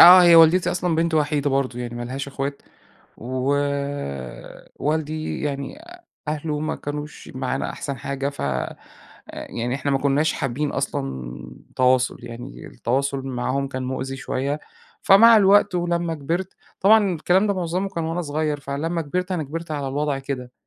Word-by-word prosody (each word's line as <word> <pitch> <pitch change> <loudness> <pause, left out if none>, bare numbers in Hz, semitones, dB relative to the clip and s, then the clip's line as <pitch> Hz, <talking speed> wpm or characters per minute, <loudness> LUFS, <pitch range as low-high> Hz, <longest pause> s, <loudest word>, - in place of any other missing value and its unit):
آه، 180 +2 +11
هي 175 -1 +7
والدتي 165 +3 +6
أصلًا 180 -1 0
بنت 165 0 +1
وحيدة 145 -1 +1
برضو 135 -2 0
يعني 120 -1 -5
ما 120 - -4
لهاش 135 +3 -4
أخوات 140 +1 -4 0.5
ووالدي 140 - -3
يعني 140 - -3 0.5
أهله 150 0 -2
ما 155 - -2
كانوش 150 +1 -6
معانا 130 +1 -2
أحسن 140 -2 -5
حاجة، 140 +2 -2
فيعني 115 - -5
إحنا 140 +1 -2
ما 135 - +2
كناش 140 +3 +2
حابين 140 0 -2
أصلًا 65 -2 -3 0.4
تواصل، 130 0 +3
يعني 120 +3 -8
التواصل 135 +2 -1
معاهم 130 +2 -1
كان 130 -1 -4
مؤذي 130 +1 -3
شوية، 140 +3 -2 0.4
فمع 225 +4 +8
الوقت 200 -1 +5
ولما 170 -1 0
كبرت 170 +6 -3 0.3
طبعًا 205 -2 +5
الكلام 180 +6 +2
ده 200 - +1
معظمه 185 +1 -1
كان 170 -4 -3
وأنا 165 +2 -2
صغير، 150 -1 -1
فلما 160 +5 -2
كبرت 180 +5 -2
أنا 170 -4 -1
كبرت 165 +3 -6
على 145 -2 -2
الوضع 145 0 -1
كده 130 -2 -5
145 Hz, 145 wpm, -23 LUFS, 135-165 Hz, 0.5 s, آه